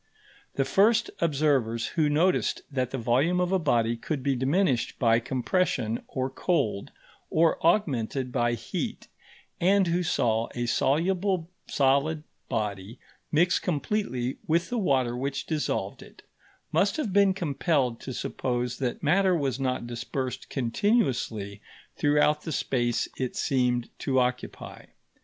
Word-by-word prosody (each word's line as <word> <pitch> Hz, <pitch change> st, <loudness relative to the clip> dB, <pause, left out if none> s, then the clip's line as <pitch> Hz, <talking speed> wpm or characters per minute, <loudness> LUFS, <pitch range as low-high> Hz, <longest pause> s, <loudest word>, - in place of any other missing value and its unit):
The 135 Hz, -, +1 dB
first 220 Hz, -, +3 dB
observers 135 Hz, -8 st, +1 dB
who 155 Hz, -3 st, +1 dB
noticed 170 Hz, +5 st, +1 dB
that 130 Hz, -3 st, -1 dB
the 135 Hz, -, -4 dB
volume 130 Hz, +9 st, +2 dB
of 180 Hz, 0 st, 0 dB
a 190 Hz, -, +3 dB
body 120 Hz, -7 st, +1 dB
could 135 Hz, +4 st, -4 dB
be 140 Hz, 0 st, +1 dB
diminished 135 Hz, -, +1 dB
by 115 Hz, -2 st, +3 dB
compression 125 Hz, -, -1 dB
or 130 Hz, 0 st, -2 dB
cold, 130 Hz, -, -1 dB, 0.4 s
or 165 Hz, +1 st, +2 dB
augmented 135 Hz, -, +1 dB
by 120 Hz, -1 st, +1 dB
heat, 120 Hz, -, -4 dB, 0.5 s
and 195 Hz, +2 st, +4 dB
who 175 Hz, +1 st, +1 dB
saw 115 Hz, -9 st, +1 dB
a 120 Hz, 0 st, -1 dB
soluble 175 Hz, -, +1 dB, 0.2 s
solid 140 Hz, +3 st, +1 dB, 0.3 s
body 105 Hz, +1 st, -3 dB, 0.3 s
mix 175 Hz, +4 st, +3 dB
completely 145 Hz, -, -2 dB
with 170 Hz, +2 st, +1 dB
the 245 Hz, -, 0 dB
water 130 Hz, -, +1 dB
which 140 Hz, +2 st, -3 dB
dissolved 155 Hz, -2 st, -2 dB
it, -, -, -15 dB, 0.5 s
must -, -, +2 dB
have 235 Hz, -11 st, -2 dB
been 200 Hz, -1 st, +4 dB
compelled 140 Hz, -7 st, 0 dB
to 130 Hz, -, -7 dB
suppose 125 Hz, -1 st, -3 dB
that 125 Hz, -3 st, -3 dB
matter 185 Hz, +4 st, +3 dB
was 140 Hz, -5 st, -1 dB
not 130 Hz, -2 st, -1 dB
dispersed 125 Hz, +2 st, -4 dB
continuously 120 Hz, -, 0 dB, 0.3 s
throughout 150 Hz, 0 st, +2 dB
the 160 Hz, -, -5 dB
space 120 Hz, -4 st, 0 dB
it 130 Hz, -2 st, -3 dB
seemed 125 Hz, -3 st, +1 dB
to 130 Hz, -1 st, +1 dB
occupy. 125 Hz, 0 st, -3 dB
135 Hz, 135 wpm, -27 LUFS, 120-170 Hz, 0.5 s, and